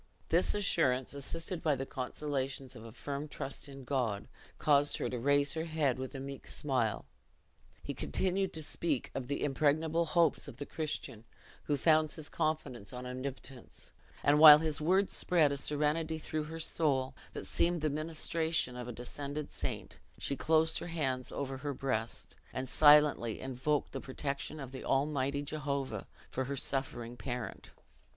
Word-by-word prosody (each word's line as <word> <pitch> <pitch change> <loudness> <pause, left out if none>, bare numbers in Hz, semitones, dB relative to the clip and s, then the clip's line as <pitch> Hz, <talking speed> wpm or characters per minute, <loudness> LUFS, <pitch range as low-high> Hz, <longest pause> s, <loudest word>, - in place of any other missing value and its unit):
This 170 +5 +3
assurance, 135 -11 +2
assisted 165 +5 -3
by 150 -3 +2
the 135 - -4
consolations 135 -1 -3
of 110 - -10
a 115 - -9
firm 140 +5 -5
trust 140 0 -5
in 135 -1 -9
God, 125 -7 -1 0.3
caused 145 -1 +3
her - - -1
to 125 - -2
raise 145 +2 +3
her 160 0 -2
head 150 -6 0
with 130 +2 -5
a - - -4
meek 135 0 -7
smile. 125 - 0 0.8
He - - -4
continued 190 - 0
to 160 - -2
speak 150 -3 -1
of 130 -2 -4
the 140 - -2
impregnable 155 +4 +2
hopes 170 +1 +2
of - - -9
the 145 - -5
Christian 140 -8 -4 0.4
who 145 - +1
founds 155 +1 +3
his 155 -2 -5
confidence 125 -10 -2
on 125 0 -7
Omnipotence; 130 0 -7 0.3
and 145 +1 +5
while 150 -1 +12
his 155 -1 +1
words 190 +5 +2
spread 160 -5 +4
a 140 - -1
serenity 150 +3 0
through 155 0 -3
her 160 +1 -7
soul, 140 -5 +1 0.2
that - - -6
seemed 170 -1 +1
the 155 - +1
ministration 160 -2 -1
of 125 -1 -6
a - - -4
descended 140 +5 -5
saint, - - -4 0.2
she 140 - -2
closed 160 +3 +2
her - - -6
hands 135 -7 -2
over 135 -1 -3
her 140 +1 -4
breast, 120 -4 -2 0.2
and 130 0 -3
silently 145 -5 +5
invoked 135 +3 -1
the - - -5
protection 140 +3 -4
of 135 -3 -7
the 130 - -7
Almighty 140 0 0
Jehovah 140 - -3 0.2
for 130 - -1
her 140 +1 -3
suffering 125 -3 0
parent. 125 -2 -5
140 Hz, 165 wpm, -33 LUFS, 130-155 Hz, 0.8 s, while